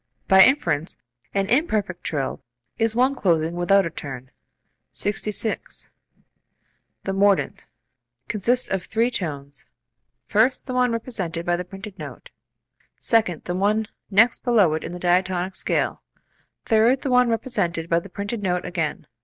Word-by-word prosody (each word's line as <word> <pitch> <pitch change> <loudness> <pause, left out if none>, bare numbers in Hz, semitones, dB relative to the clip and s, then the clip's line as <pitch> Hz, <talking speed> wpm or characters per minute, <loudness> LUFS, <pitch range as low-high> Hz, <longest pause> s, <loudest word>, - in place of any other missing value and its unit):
By 190 0 +8
inference, 170 - +1 0.3
an 195 -1 0
imperfect 215 - 0
trill 140 -4 -2 0.4
is 225 -1 +1
one 255 +3 +3
closing 170 - +1
without 175 +2 +3
a 165 - -3
turn. 130 -3 -7 0.6
66. 210 +2 -1 1.1
The 195 - -2
mordent - - -4
[mordent 200 -1 +3
symbol] - - -25 0.6
consists 240 +4 +1
of 190 -2 -2
three 230 +3 +1
tones; 145 - -5 0.6
first 235 +5 +2
the 255 - -5
one 250 -1 +2
represented 190 -8 -4
by 175 - +2
the 180 - -3
printed 195 +2 -10
note; - - -9 0.6
second 210 -8 +1
the 175 - -3
one 205 +3 +1 0.2
next 225 +4 +4
below 215 -10 +4
it 155 - -2
in - - -5
the - - -5
diatonic 180 +1 +1
scale; - - -1 0.6
third 230 +4 +3
the 270 - -1
one 250 -1 +4
represented 200 -8 -1
by 170 0 +2
the 200 - -12
printed 205 +4 -4
note 180 -2 -1
again. 160 -4 -3
195 Hz, 145 wpm, -23 LUFS, 175-230 Hz, 1.1 s, By